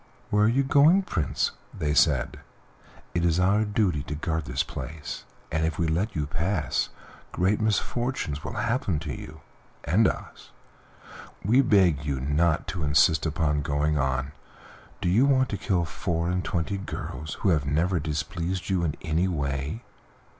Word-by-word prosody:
"Where 105 0 +4
are - - +4
you 135 +4 +2
going, 150 +7 +5
Prince?" 85 - -1 0.2
they 75 -1 -1
said; - - +2 0.7
"it 85 - 0
is 85 0 +2
our 100 +4 +3
duty 105 -8 +1
to 75 - -4
guard 80 0 -2
this 65 +3 0
place, 75 -1 -7 0.3
and 80 0 0
if 80 -1 -1
we 85 - +1
let 85 +7 -1
you 75 -2 0
pass 80 0 -1 0.4
great 95 +5 +1
misfortunes 110 - -1
will - - -5
happen 115 - 0
to 75 -2 -4
you 75 +3 -9 0.4
and 100 +9 +3
to - - +2
us. - - -16 1.0
We 120 +7 +5
beg 95 - +3
you 70 -3 -2
not 75 +4 +1
to 90 - -3
insist 75 +2 +4
upon 75 -2 0
going 75 +1 0
on. 65 0 -1 0.7
Do - - 0
you 110 +10 +4
want 130 -2 +3
to - - -2
kill 90 -4 0
four 85 +3 -2
and 90 0 -1
twenty 85 +2 -2
girls 80 -5 -6
who 100 - +2
have 75 -5 +2
never 85 +5 +1
displeased 85 +4 -3
you 90 -2 +1
in 75 -3 -1
any 85 +3 +1
way?" 70 - -2
85 Hz, 165 wpm, -26 LUFS, 75-100 Hz, 1.0 s, going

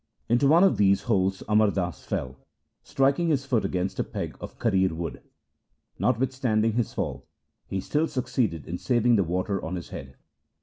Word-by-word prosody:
Into 120 +4 +3
one 165 +5 +6
of 195 - +4
these 100 -1 +3
holes 95 -4 0
Amar 105 0 +4
Das 90 -4 -3
fell, 65 +1 -4 0.4
striking 140 +5 +1
his 140 -4 +1
foot 125 -5 +1
against 95 +1 -2
a - - +2
peg - - -5
of - - -9
karir 95 -5 +2
1 80 - -7
wood. 85 -2 -5 0.8
Notwithstanding 125 -3 +1
his 120 0 0
fall 70 -9 -4 0.4
he 95 - -2
still 150 +11 0
succeeded 120 - -1
in 90 +1 -5
saving 120 -1 +3
the 100 - +3
water 90 +3 -2
on 85 +3 -3
his 85 - -7
head. 65 0 -8
105 Hz, 175 wpm, -26 LUFS, 90-125 Hz, 0.8 s, one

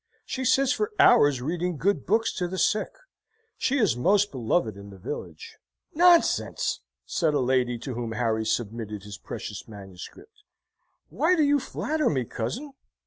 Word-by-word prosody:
She 260 -1 -4
sits 270 +2 +3
for 425 +8 0
hours 145 -4 +5
reading 175 +3 -2
good 185 -3 0
books 225 +3 +2
to 180 - -1
the 190 +2 -5
sick: 210 +3 +1 0.7
she 275 - 0
is 215 - +2
most 200 +11 +2
beloved 115 - 0
in 100 0 -11
the 100 - -12
village." 90 - -8 0.4
"Nonsense!" 345 0 +3 0.3
said 160 -4 0
a - - +2
lady 125 -1 +1
to 130 +3 -6
whom 115 -1 -4
Harry 110 -1 0
submitted 110 -3 -3
his 105 -2 -9
precious 105 +1 -7
manuscript. 105 - -12 0.7
"Why 365 - +2
do 315 - +3
you 285 0 +3
flatter 305 +3 -1
me, 130 -5 -1
cousin?" 130 - -5
145 Hz, 155 wpm, -26 LUFS, -, 0.7 s, hours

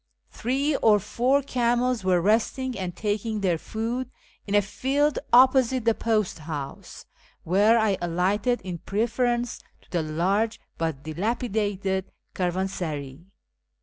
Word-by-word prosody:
Three 275 +5 0
or 215 -2 +5
four 260 +8 +1
camels 245 -2 +1
were 185 -2 +3
resting 235 +6 +1
and 180 -2 -4
taking 215 +1 -2
their 175 -4 +1
food 235 +6 -3 0.4
in 200 - 0
a 205 - +6
field 275 +8 0
opposite 255 -1 +5
the 230 - +4
post 215 -6 0
house, 150 -3 -7 0.4
where 205 +7 +4
I 215 -4 +2
alighted 190 +8 0
in 180 -2 -6
preference 240 +4 -1 0.2
to - - -27
the 175 - +1
large 190 +8 0 0.2
but 160 -4 -2
dilapidated 200 +1 -2 0.2
caravansaray. 175 -7 -3
210 Hz, 120 wpm, -25 LUFS, 180-240 Hz, 0.4 s, a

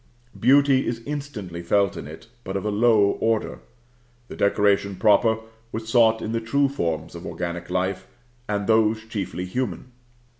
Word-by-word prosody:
Beauty 135 +1 +4
is 115 -1 -3
instantly 130 -13 -6
felt 100 +2 +1
in - - -7
it, 80 +1 -11 0.2
but 95 -2 -3
of 95 - -5
a 105 - 0
low 105 -2 +3
order. 115 -1 0 0.7
The - - -8
decoration 100 -1 +2
proper 110 +2 +3 0.3
was 110 0 -5
sought 115 -1 +4
in 110 - -3
the 115 0 -1
true 140 +5 +1
forms 85 - -3
of - - -9
organic 85 0 -5
life, 95 0 -2 0.4
and 100 -1 -1
those 110 0 +2
chiefly 95 -5 -4
human. 120 +2 -4
105 Hz, 155 wpm, -24 LUFS, 95-115 Hz, 0.7 s, Beauty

